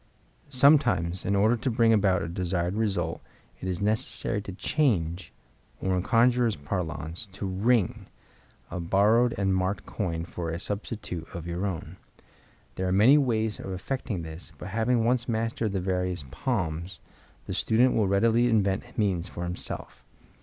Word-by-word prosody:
—Sometimes, 130 - +3
in 100 - +1
order 110 +4 +4
to 120 +3 -2
bring 115 -1 +4
about 100 -4 +3
a - - -3
desired 90 +1 -1
result, 100 -4 -1 0.4
it 95 - -5
is 90 0 -2
necessary 105 -1 +1
to 100 - -7
change, 90 - 0 0.5
or 95 -1 0
in 90 - +1
conjurers' 120 +2 +3
parlance 80 +3 -4
to 100 +1 -5
"ring," 100 +2 +1 0.6
a - - -3
borrowed 105 +7 +3
and 95 -1 +1
marked 95 +1 -1
coin 85 -5 -3
for 85 -1 -5
a 80 - -2
substitute 100 -3 -5
of 85 -2 -6
your 85 +3 -2
own. 85 -1 -5 0.8
There 95 - -1
are - - 0
many 115 +10 +6
ways 110 -5 0
of 95 - -6
effecting 100 -1 -3
this, 80 +1 -9
but 90 - -7
having 115 +3 +1
once 120 0 +1
mastered 115 -1 -1
the 95 - -1
various 90 -3 -2
"palms" 85 - -2 0.5
the - - -4
student 120 +3 +3
will 105 -3 +2
readily 115 +5 +3
invent 100 0 0
means 95 -6 0
for 85 - -6
himself. 90 0 -6
100 Hz, 155 wpm, -27 LUFS, 90-115 Hz, 0.8 s, many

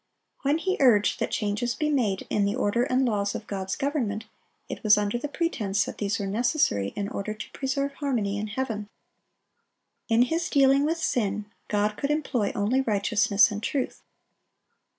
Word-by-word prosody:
When 285 +3 +2
he 375 +3 -1
urged 225 -7 +4
that - - -1
changes 215 +3 -1
be 305 - -1
made 215 -9 0
in 205 - +2
the 200 +1 0
order 205 +4 +1
and 260 0 +2
laws 205 -3 0
of 215 - -5
God's 190 -2 -3
government, 235 -7 -2 0.4
it - - -6
was 210 -1 +6
under 210 +3 0
the 295 - -3
pretense 230 - 0
that - - -7
these 200 -1 0
were 200 - -3
necessary 205 - +1
in 200 -1 -2
order 215 +1 -4
to 215 - -8
preserve 275 +1 -2
harmony 230 -9 -1
in 215 - -3
heaven. 210 -2 -3 1.2
In 230 +1 +5
His 325 +6 -1
dealing 275 0 +4
with 325 +2 0
sin, 210 -9 -1 0.2
God 210 0 0
could 280 - -2
employ 275 -8 0
only 220 +6 +2
righteousness 210 -2 +3
and 205 0 -4
truth. 260 +3 -2
220 Hz, 170 wpm, -26 LUFS, 205-270 Hz, 1.2 s, was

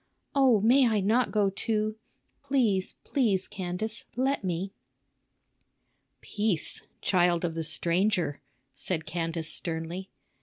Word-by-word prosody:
Oh, 260 -7 +4
may 250 +4 +5
I 220 -2 +2
not 225 +6 +2
go 205 -2 +2
too? 215 +1 -1 0.5
Please, 240 -9 +1
please, 210 -9 +1
Candace, 190 +4 -4
let 265 0 0
me." 185 +2 -2 1.5
"Peace! 205 -6 0
child 175 -2 +2
of 165 - -2
the 165 0 -3
stranger," 170 0 +1 0.3
said 160 -4 -3
Candace 165 -1 -2
sternly. 170 +3 -4
195 Hz, 110 wpm, -28 LUFS, 170-220 Hz, 1.5 s, may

